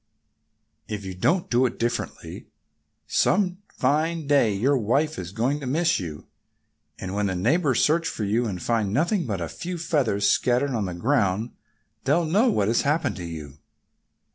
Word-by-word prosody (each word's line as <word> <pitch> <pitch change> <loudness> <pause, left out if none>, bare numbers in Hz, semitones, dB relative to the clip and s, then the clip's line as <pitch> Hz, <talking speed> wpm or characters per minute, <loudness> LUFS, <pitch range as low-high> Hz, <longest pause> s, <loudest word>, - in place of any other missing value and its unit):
If 105 -2 -5
you 95 - -5
don't 170 - +1
do 125 +1 +3
differently, 120 0 -4 0.6
some 185 -2 +1 0.2
fine 155 +4 0
day 140 -6 +3
your 120 +9 +2
wife 135 +7 0
is 90 0 -6
going 120 +8 0
to 140 - -6
miss 165 +6 +2
you. 80 -5 -7 0.7
And 95 0 -6
when 105 0 0
the 95 - -2
neighbors 130 - +2
search 160 +2 +2
for 110 - -4
you, 115 +4 +1
and 95 -4 -4
find 110 -4 0
nothing 165 - +1
but 100 -5 -2
a 85 - -2
few 175 - -6
feathers 130 -12 +1
scattered 125 +6 +2
on 110 -5 -1
the 90 -2 -4
ground, 110 0 +1 0.5
they'll 155 +6 +2
know 205 +11 +3
what 100 - +1
has 115 +2 +2
happened 150 -1 0
to 90 - -6
you." 75 -4 -8
120 Hz, 165 wpm, -25 LUFS, 100-155 Hz, 0.7 s, do